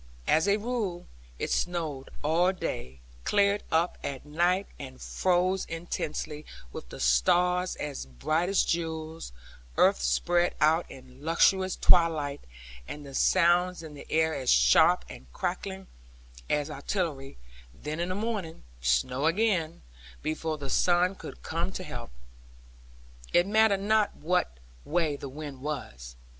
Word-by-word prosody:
As 160 Hz, -, +3 dB
a 200 Hz, +1 st, +4 dB
rule, 215 Hz, -6 st, -3 dB, 0.3 s
it -, -, -3 dB
snowed 160 Hz, -6 st, -2 dB
all 170 Hz, +5 st, +3 dB
day, 65 Hz, -, -5 dB, 0.2 s
cleared 200 Hz, 0 st, +3 dB
up 165 Hz, +2 st, +1 dB
at 135 Hz, 0 st, -5 dB
night, 175 Hz, +6 st, +1 dB
and 130 Hz, -2 st, -9 dB
froze 185 Hz, +1 st, +1 dB
intensely, 155 Hz, -2 st, -4 dB, 0.3 s
with -, -, -8 dB
the -, -, -9 dB
stars 180 Hz, -, +3 dB
as 145 Hz, -, -5 dB
bright 155 Hz, -, -1 dB
as 195 Hz, -, +3 dB
jewels, 160 Hz, -, -3 dB, 0.5 s
earth -, -, +4 dB
spread 175 Hz, -, +2 dB
out 160 Hz, +3 st, +3 dB
in 130 Hz, +1 st, -13 dB
lustrous 185 Hz, +3 st, +3 dB
twilight, 155 Hz, -5 st, +3 dB, 0.5 s
and 150 Hz, 0 st, -7 dB
the 135 Hz, -, -10 dB
sounds 175 Hz, +2 st, +3 dB
in 155 Hz, -2 st, -9 dB
the 145 Hz, -, -12 dB
air 160 Hz, 0 st, +2 dB
as 135 Hz, -4 st, -2 dB
sharp -, -, +5 dB
and 65 Hz, -1 st, -12 dB
crackling 190 Hz, +2 st, -4 dB, 0.6 s
as 150 Hz, +1 st, 0 dB
artillery; 145 Hz, -, -3 dB, 0.3 s
then 150 Hz, -, -6 dB
in 175 Hz, +1 st, -1 dB
the 185 Hz, -, -2 dB
morning, 205 Hz, -6 st, -3 dB, 0.2 s
snow 95 Hz, -, +1 dB
again; 170 Hz, -3 st, +1 dB, 0.4 s
before 155 Hz, 0 st, -2 dB
the 140 Hz, -2 st, -5 dB
sun 180 Hz, +1 st, +3 dB
could -, -, -10 dB
come 170 Hz, +3 st, -2 dB
to 185 Hz, -, -5 dB
help. 120 Hz, -8 st, -7 dB, 1.2 s
It 175 Hz, -, +5 dB
mattered 210 Hz, -1 st, +3 dB
not 215 Hz, +1 st, +2 dB
what 155 Hz, -, 0 dB, 0.3 s
way 160 Hz, -2 st, 0 dB
the 140 Hz, -, -7 dB
wind 145 Hz, -1 st, -8 dB
was. 65 Hz, -, -6 dB
160 Hz, 135 wpm, -28 LUFS, 140-180 Hz, 1.2 s, sharp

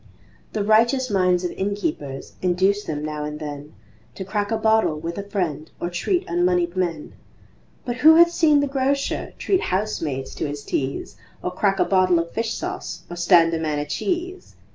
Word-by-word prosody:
The 210 Hz, -, -1 dB
righteous 235 Hz, +4 st, +3 dB
minds 185 Hz, -2 st, +2 dB
of 180 Hz, -, -2 dB
innkeepers 195 Hz, -, -3 dB
Induce 190 Hz, +3 st, +1 dB
them 150 Hz, -1 st, -3 dB
now 150 Hz, -1 st, -4 dB
and 150 Hz, 0 st, -5 dB
then 145 Hz, -1 st, -7 dB, 0.4 s
To 190 Hz, -, -6 dB
crack 205 Hz, +1 st, -2 dB
a 225 Hz, -, 0 dB
bottle 220 Hz, -8 st, +2 dB
with 170 Hz, +4 st, -5 dB
a 200 Hz, 0 st, -7 dB
friend 160 Hz, -6 st, -2 dB
Or 175 Hz, -, -3 dB
treat 355 Hz, -, 0 dB
unmoneyed 175 Hz, 0 st, +1 dB
men, 170 Hz, -5 st, -2 dB, 0.7 s
But 240 Hz, -1 st, -3 dB
who 315 Hz, +5 st, +7 dB
hath 340 Hz, +1 st, +7 dB
seen 305 Hz, -4 st, +4 dB
the 285 Hz, -, 0 dB
Grocer 275 Hz, +1 st, -1 dB
Treat 380 Hz, -2 st, +1 dB
housemaids 165 Hz, -9 st, -2 dB
to -, -, -3 dB
his 145 Hz, 0 st, -6 dB
teas 135 Hz, 0 st, -3 dB, 0.3 s
Or 180 Hz, -, -2 dB
crack 195 Hz, +1 st, +1 dB
a -, -, +3 dB
bottle 185 Hz, -2 st, +3 dB
of 170 Hz, 0 st, -2 dB
fish 225 Hz, 0 st, -2 dB
sauce -, -, -5 dB
Or -, -, -5 dB
stand 170 Hz, -1 st, +4 dB
a 165 Hz, -, 0 dB
man 155 Hz, -2 st, -1 dB
a 145 Hz, -, -2 dB
cheese? 360 Hz, -, -3 dB
185 Hz, 185 wpm, -23 LUFS, 160-220 Hz, 0.7 s, who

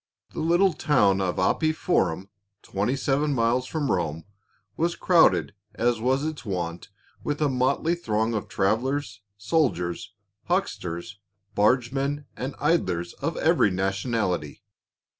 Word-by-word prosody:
THE -, -, -6 dB
little 175 Hz, +3 st, +3 dB
town 105 Hz, -11 st, +2 dB
of 90 Hz, -2 st, -1 dB
Appii 155 Hz, +12 st, +1 dB
Forum, 95 Hz, -, 0 dB, 0.3 s
twenty 105 Hz, +7 st, -1 dB
seven 140 Hz, +2 st, 0 dB
miles 120 Hz, +2 st, +1 dB
from 150 Hz, -2 st, -1 dB
Rome, 80 Hz, -3 st, -1 dB, 0.5 s
was 170 Hz, +1 st, 0 dB
crowded 175 Hz, -3 st, +4 dB, 0.2 s
as 120 Hz, -1 st, +1 dB
was 130 Hz, +4 st, +1 dB
its 155 Hz, -1 st, -4 dB
wont 90 Hz, -5 st, -4 dB, 0.3 s
with 145 Hz, 0 st, -2 dB
a 150 Hz, -, +2 dB
motley 135 Hz, +5 st, +1 dB
throng 110 Hz, -9 st, -1 dB
of 105 Hz, -, -3 dB
travelers, 110 Hz, +2 st, -1 dB, 0.2 s
soldiers, 100 Hz, -, -1 dB, 0.3 s
huck 185 Hz, +3 st, +2 dB
sters, 85 Hz, +3 st, -7 dB, 0.3 s
bargemen, 135 Hz, +6 st, +1 dB
and 135 Hz, +2 st, -5 dB
idlers 90 Hz, -, 0 dB
of -, -, -2 dB
every -, -, +3 dB
nationality. 95 Hz, -, -2 dB
120 Hz, 125 wpm, -25 LUFS, 95-145 Hz, 0.5 s, crowded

